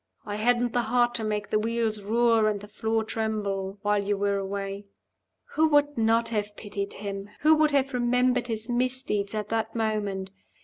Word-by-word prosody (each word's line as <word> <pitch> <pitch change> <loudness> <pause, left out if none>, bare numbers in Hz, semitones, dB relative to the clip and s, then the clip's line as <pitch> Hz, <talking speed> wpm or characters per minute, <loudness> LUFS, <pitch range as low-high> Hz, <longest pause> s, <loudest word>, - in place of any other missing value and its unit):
"I 205 0 -4
hadn't 240 +2 +2
the 245 - +2
heart 240 +1 +2
to 225 - -2
make 210 -1 -2
the 215 - +3
wheels 225 -1 -1
roar 225 +1 +3
and 205 -1 -2
the 205 - -11
floor 220 +1 -1
tremble 205 -3 -2
while 205 -1 +2
you 205 0 0
were 200 0 +1
away." 195 +1 -4 0.7
Who 320 +1 +4
would 290 -1 +3
not 230 0 +2
have 210 -2 -3
pitied 200 -1 -5
him? 200 0 -6
Who 310 +1 +6
would 305 0 +4
have 275 -2 +1
remembered 250 0 +2
his 220 -1 -3
misdeeds 245 -4 -1
at 210 -1 -3
that 225 0 -2
moment? 205 -4 -2
220 Hz, 180 wpm, -27 LUFS, 205-240 Hz, 0.7 s, Who